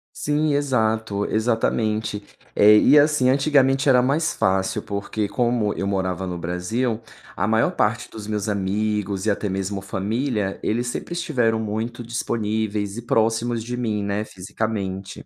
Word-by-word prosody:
Sim, 150 0 0
exato, 110 -7 0
exatamente, 110 -2 0 0.3
eh, 105 +1 +7
e 145 +7 +6
assim 145 -4 +4
antigamente 135 -1 +3
era 125 -2 +6
mais 140 +6 +1
fácil, 95 0 0
porque 100 +1 -3
como 120 -3 0
eu 100 - -3
morava 95 -1 -1
no 90 -1 -4
Brasil 110 +8 -2 0.3
a 90 - 0
maior 110 +1 +2
parte 105 0 0
dos 105 -2 -8
meus 105 -1 -2
amigos 100 0 -1
e 110 - +3
até 100 0 -2
mesmo 95 +1 -3
família 105 +2 -2
eles 120 +3 -1
sempre 125 +7 -4
estiveram 125 -10 0
muito 110 +3 -3
disponíveis 110 -3 -2
e 120 - -5
próximos 115 0 +1
de 120 +2 -4
mim, 110 -4 -1
né, 100 +1 -1
fisicamente. 95 -1 -5
110 Hz, 145 wpm, -23 LUFS, 100-120 Hz, 0.3 s, eh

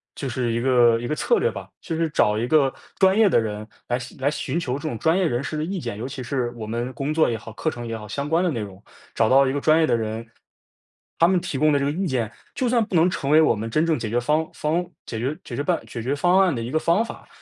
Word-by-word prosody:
就 140 - -4
是 120 -1 -1
一 115 - 0
个 120 -2 +4
一 120 - -4
个 155 - -1
策 475 - +2
略 - - +2
吧， - - -8
就 165 - -4
是 165 -1 0
找 105 -7 +2
一 115 - 0
个 140 -2 +3 0.3
专 190 +1 +5
业 220 -2 +5
的 165 - +4
人 105 -1 -4 0.2
来 120 - 0 0.2
来 135 +2 +2
寻 150 +2 -2
求 125 -7 -3
这 145 - -9
种 120 - -3
专 165 +3 +2
业 190 - +2
人 120 -6 0
士 155 - -4
的 150 - -1
意 185 +4 -3
见， 120 -8 -5
尤 115 - -5
其 135 0 -7
是 120 -1 -2
我 110 - -5
们 120 +3 -3
工 140 +5 -2
作 160 0 +3
也 115 - -1
好， 115 0 -10
课 155 - -1
程 120 -3 -7
也 115 - -4
好， 105 - -9
相 140 +7 -4
关 165 +3 +2
的 180 - +1
内 120 - -3
容， 100 -2 -8 0.3
找 110 -1 +3
到 135 +1 +5
一 130 - 0
个 145 - -2
专 155 +2 +4
业 160 - +3
的 - - +3
人 110 0 -3 0.9
他 165 - +6
们 185 0 +3
提 145 - -4
供 155 +2 +3
的 145 - +3
这 140 - 0
个 140 - +1
意 185 +6 -2
见， 125 - -1 0.2
就 255 - -1
算 235 -2 +2
不 195 - -5
能 170 +2 +5
成 145 -5 -2
为 155 - +7
我 155 - +4
们 110 +2 -4
真 155 +7 +1
正 165 -2 +1
解 110 - -4
决 120 - +1
方 150 +6 +1
方 165 +4 -1 0.2
解 115 - -5
决 135 +6 -2
解 120 - -6
决 145 - -2
办 170 +3 0
解 115 - -6
决 130 +4 0
方 175 +6 +3
案 185 -4 +3
的 120 - -3
一 115 - -4
个 155 - 0
方 170 +8 +2
法。 - - -10
140 Hz, 325 characters per minute, -23 LUFS, 120-160 Hz, 0.9 s, 为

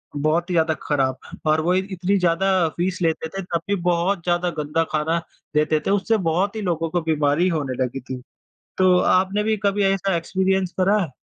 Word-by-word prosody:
बहुत 155 +5 0
ही 180 - -1
ज़्यादा 160 -1 +2
ख़राब। 135 -3 0 0.3
और 155 +1 +3
वो 175 +3 +1
इत 190 +1 0
इतनी 190 +2 0
ज़्यादा 180 0 +2
फ़ीस 180 +1 -1
लेते 160 -1 0
थे 195 +3 -5
तब 170 -2 -2
भी 200 - +2
बहुत 175 +1 0
ज़्यादा 175 0 +1
गंदा 150 +2 0
खाना 160 +2 0 0.4
देते 155 0 +2
थे। - - +2
उससे 205 +3 +2
बहुत 195 +6 0
ही 220 - -3
लोगों 165 -1 -1
को 175 +1 -1
बीमारी 155 +1 +1
होने 130 -3 -2
लगी 125 +1 -4
थी। 130 0 -7 0.6
तो 185 -1 +5
आपने 190 +4 +2
भी 220 0 +1
कभी 200 0 +2
ऐसा 195 -1 0
एक्सपीरियंस 190 +1 0
करा 200 +3 +3
है? 160 - -5
175 Hz, 200 wpm, -22 LUFS, 155-190 Hz, 0.6 s, तो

